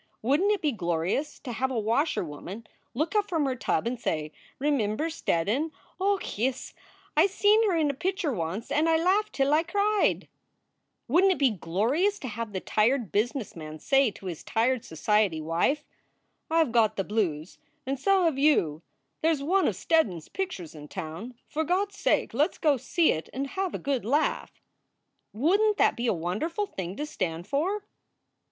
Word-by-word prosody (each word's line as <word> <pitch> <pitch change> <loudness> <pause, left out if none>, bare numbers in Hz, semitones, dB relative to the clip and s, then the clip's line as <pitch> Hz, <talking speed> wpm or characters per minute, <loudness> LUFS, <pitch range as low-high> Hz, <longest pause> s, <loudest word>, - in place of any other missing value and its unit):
Wouldn 285 - +3
t 420 - +4
it 400 - -9
be 300 - +2
glorious 175 - -1
to 255 - -6
have 255 +3 -1
a 255 - -2
washer 230 - +1
woman 180 +9 -8 0.3
look 310 - -1
up 415 -1 +2
from 325 -5 +1
her 265 -2 0
tub 240 - -1
and 240 +1 -2
say: 155 -7 -2 0.3
Remimber 280 +1 0
Steddon? 245 - 0 0.3
Och, 390 - -1
yis, 255 +3 -1 0.4
I - - +6
seen 420 +2 +3
her 350 - +1
in 300 -3 +2
a - - -9
pitcher 365 0 -1
once 180 +5 -4
and 315 +3 +2
I 325 - +4
laughed 385 +6 +1
till 275 +1 +2
I 310 - +5
cried? 405 +4 +1 0.8
Wouldn 355 +9 +4
t - - +5
it - - -7
be 270 -4 +3
glorious 225 - 0
to 265 - -6
have 225 0 -5
the 190 - -3
tired 225 +3 +1
business 235 +2 -1
man 155 -1 -8
say 270 - +3
to 200 - -13
his 175 -4 -5
tired 240 +2 +1
society 195 +1 +1
wife: 165 - 0 0.6
I 325 0 +4
ve 270 - -4
got 220 -2 +3
the 195 - -1
blues, 185 -7 -2 0.3
and 270 +1 -2
so 385 +5 +3
have 320 -6 +1
you. 170 - +3 0.4
There 320 - +3
s 300 -4 0
one 375 +6 +2
of - - 0
Steddon 320 - +2
s 160 - -12
pictures 360 - -4
in 150 -1 -10
town. 185 +9 -7
For 315 - -1
God 370 +5 +1
s 400 - -16
sake - - +1
let 300 +6 +2
s - - -17
go 300 -3 +3
see 325 +6 +2
it 160 - -4
and 270 +2 -2
have 380 -2 -2
a - - -1
good 275 -3 -1
laugh! 285 +8 -1 0.7
Wouldn 395 - +3
t - - -26
that - - +4
be 240 +1 -2
a - - +4
wonderful 210 - -2
thing 190 - -6
to 295 - -3
stand 175 - -3
for?" 360 - -1
270 Hz, 195 wpm, -27 LUFS, 205-330 Hz, 0.8 s, I